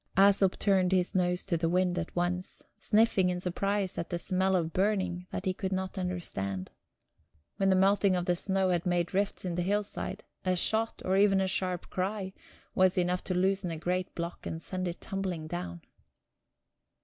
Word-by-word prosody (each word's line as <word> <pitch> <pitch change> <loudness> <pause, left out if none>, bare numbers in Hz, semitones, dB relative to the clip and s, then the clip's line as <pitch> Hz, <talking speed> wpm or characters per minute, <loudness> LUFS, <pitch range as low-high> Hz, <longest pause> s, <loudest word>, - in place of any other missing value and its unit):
Æsop 195 -1 +5
turned 190 -2 +2
his 180 -1 +1
nose 180 -1 +1
to 175 -4 0
the 165 0 0
wind 180 0 +1
at 165 - -5
once, 180 +1 -2 0.2
sniffing 210 -4 +3
in 180 0 -1
surprise 195 +2 -1
at 170 - -4
the 175 - -1
smell 185 +2 +1
of 165 -3 0
burning 185 -2 0
that 185 - -5
he 185 - +1
could 190 +1 -4
not 190 +1 -2
understand. 135 - -3 0.9
When 195 -1 +2
the 190 - +5
melting 195 0 +4
of 175 -1 -1
the 180 - +2
snow 190 +1 +1
had 175 0 0
made 175 0 0
rifts 200 0 0
in 180 - -2
the 175 - -1
hillside, 205 +1 -2 0.2
a 185 -1 +1
shot, 220 +5 0
or 190 +1 +2
even 195 -1 +5
a 190 - +1
sharp 185 -2 -2
cry, 190 0 -2 0.4
was 185 0 +3
enough 180 0 +1
to 185 - -1
loosen 190 0 +1
a 165 - -4
great 180 +3 -2
block 170 0 -5
and 160 - -4
send 185 +2 -4
it 175 - -5
tumbling 185 -5 -3
down... 85 - -5
185 Hz, 185 wpm, -30 LUFS, 175-195 Hz, 0.9 s, Æsop